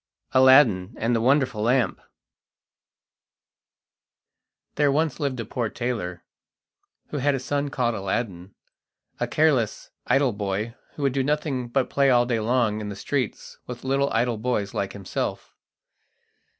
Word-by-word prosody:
Aladdin 130 -7 +5
and 115 +2 +1
the 115 - +1
Wonderful 130 -3 +2
Lamp 120 -3 +1 2.7
There 145 -2 +2
once 155 +1 0
lived 140 -4 -2
a 115 - -3
poor 115 +1 -2
tailor, 105 -9 -4 0.9
who 150 - -4
had 140 +1 +2
a - - -2
son 140 +2 -2
called 125 -3 0
Aladdin, 95 -2 -3 0.6
a - - 0
careless, 145 -8 +1 0.2
idle 135 -1 +3
boy 100 +2 -3 0.2
who 145 - -5
would 135 -2 +2
do 135 - +1
nothing 145 -3 -1
but 130 +2 0
play 140 -1 +3
all 120 -1 +4
day 120 -2 0
long 110 -1 +1
in 105 - -5
the 100 - -6
streets 130 +4 -3
with 125 -1 -7
little 135 +1 +1
idle 115 -1 0
boys 110 -4 -1
like 100 - -2
himself. 100 -2 -4
125 Hz, 140 wpm, -25 LUFS, 110-135 Hz, 2.7 s, Aladdin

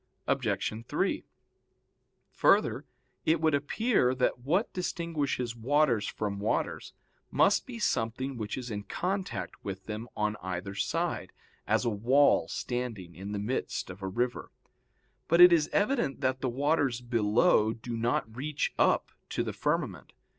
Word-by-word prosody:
Obj. 110 +1 -1
3: - - 0 1.1
Further, - - +3 0.4
it 160 +1 +3
would 160 -1 +2
appear 145 - +2
that 125 -1 +1
what 170 - 0
distinguishes 160 -9 -2
waters 125 -1 +2
from 100 -2 -3
waters 105 +2 -2 0.4
must - - +3
be 250 -2 -7
something 130 - -1
which 110 -1 -4
is 125 -2 -5
in 105 -1 -3
contact 180 - -3
with 95 -1 -6
them 110 +2 -5
on 105 0 0
either 95 +1 -4
side, - - -2 0.4
as - - +2
a 120 - +2
wall 125 +8 +4
standing 115 -8 -4
in 95 +5 -7
the 105 - -2
midst 105 -2 -2
of 95 +2 -12
a 95 - -3
river. 120 +5 -2 0.8
But 170 - +3
it 175 0 +10
is 155 -3 +3
evident 205 - +1
that 130 -1 0
the 130 - 0
waters 140 -1 +1
below 115 0 +3
do 115 +1 -6
not 115 -1 -1
reach 145 +3 -2
up - - +3 0.2
to - - -1
the - - -4
firmament. - - -2
125 Hz, 145 wpm, -29 LUFS, 105-150 Hz, 1.1 s, it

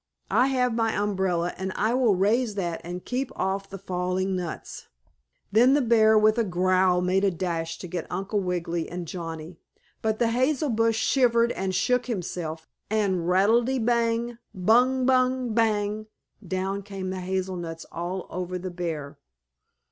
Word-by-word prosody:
"I 255 - +4
have 250 -3 +1
my 225 -1 +1
umbrella, 190 -4 0
and 190 0 -3
I 220 +3 +1
will 245 -5 +3
raise 215 +4 +1
that 175 -4 -2
and 175 +1 -6
keep 255 +1 -2
off 195 +1 -2
the 195 - -7
falling 185 0 -2
nuts." 175 -3 -6 0.6
Then 245 +6 +5
the 290 - +3
bear, 220 -3 +5
with 215 +2 +4
a - - +3
growl, 185 -1 +2
made 185 +2 +1
a 200 - +4
dash 165 -2 -3
to 180 - -8
get 175 -1 -4
Uncle 195 +3 -1
Wiggily 175 -3 -2
and 175 -1 -5
Johnnie. 165 -1 -6 0.4
But 220 -1 0
the 235 0 +2
hazel 260 +4 +1
bush 225 0 +2
shivered 235 0 +3
and 190 -3 -2
shook 250 +3 +1
himself 170 -7 -4 0.2
and 190 -5 0
"Rattle 205 +6 +4
te 260 +2 -1
bang! 235 0 0 0.2
Bung 245 +7 +3
bung! 255 -2 +2
Bang!" 215 -1 0 0.4
down 190 +2 -2
came 195 -2 -5
the 185 - -4
hazel 185 0 -2
nuts 165 -2 -6
all 175 +3 -4
over 180 0 -3
the 185 0 -5
bear. 155 -5 -5
195 Hz, 165 wpm, -26 LUFS, 180-230 Hz, 0.6 s, Then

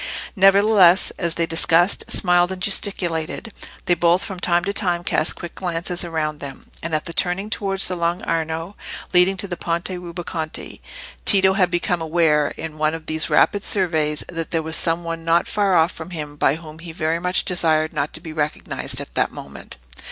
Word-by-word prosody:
Nevertheless, 195 -2 +5
as 170 -2 0
they 170 - +1
discussed, 165 +2 +2
smiled, 175 0 +2
and 190 - -5
gesticulated, 185 0 -1 0.3
they 175 - +3
both, 175 +2 +2
from 190 -2 -6
time 175 0 +1
to 200 +2 -2
time, 175 -4 0
cast 160 - +1
quick 175 - -8
glances 175 -1 -2
around 155 -3 -3
them, 140 -2 -9
and 165 -1 -2
at 155 - -2
the 170 - -5
turning 190 +5 +1
towards 195 -2 +1
the 185 - 0
Lung' 170 +1 -1
Arno, 165 +3 -3 0.4
leading 180 +2 +5
to 200 - -2
the 180 - -4
Ponte 170 +1 -2
Rubaconte, 170 -2 -6 0.4
Tito 190 -2 +4
had 185 -2 +2
become 175 0 -1
aware, 160 -2 +2
in 155 -1 -7
one 155 +1 +1
of 165 -1 -9
these 155 0 -2
rapid 205 0 +3
surveys, 160 -6 +1
that 165 -2 -5
there 165 -1 -1
was 160 +1 -3
some 165 +1 0
one 165 -1 -5
not 165 +1 +2
far 200 -3 +1
off 165 +1 +2
him 155 -4 -6
by 145 -1 +2
whom 160 -1 -11
he 170 0 -8
very 160 0 -1
much 180 +1 -1
desired 160 -3 +1
not 145 -1 -2
to - - -4
be 160 -2 -8
recognised 150 -1 -2
at - - -7
that - - +1
moment. - - -10
170 Hz, 190 wpm, -21 LUFS, 160-185 Hz, 0.4 s, Nevertheless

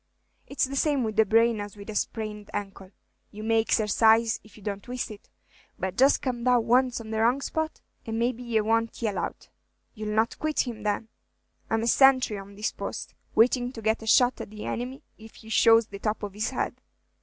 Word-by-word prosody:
'T - - -10
is - - +2
the 275 +1 -1
same 280 -2 +1
with 220 -2 -3
the 220 -1 +4
brain 225 0 +3
as 205 0 -8
with 200 - -10
a 215 - -5
sprained 210 -1 -3
ankle; 195 -2 -6 0.4
you 215 +1 -9
may 225 0 +3
exercise 220 +1 +3
if 215 - -18
you 210 - -15
don't 200 -1 -4
twist 245 0 -5
it; 210 - -13 0.5
but 190 0 -3
just 270 +5 +4
come 245 -3 -2
down 245 -2 +3
once 250 +1 +3
on 220 -1 -8
the 220 - -1
wrong 240 +4 +3
spot, 315 +3 -3 0.3
and 225 0 -2
maybe 240 +1 0
ye 235 -2 0
won't 225 +1 0
yell 210 -3 0
out!" - - -5 0.4
"You 215 -2 -6
'll 210 - -2
not 220 +1 +1
quit 310 -1 +1
him, 235 -4 -5
then." 210 +1 -2 0.6
"I'm 225 0 0
a - - 0
senthry 255 -3 +4
on 200 +1 -14
his 210 - -1
post, - - -6 0.2
waiting 245 +2 +3
to 225 - -8
get 220 +1 +1
a 220 - -9
shot 245 +3 +4
at - - -7
the 210 0 -8
enemy 255 +4 -4 0.2
if 220 0 -14
he 220 - -14
shows 225 0 +5
the 200 -2 -10
top 215 +1 -2
of 205 -2 -4
his 210 +2 -2
head. - - -3
225 Hz, 220 wpm, -27 LUFS, 215-245 Hz, 0.6 s, shows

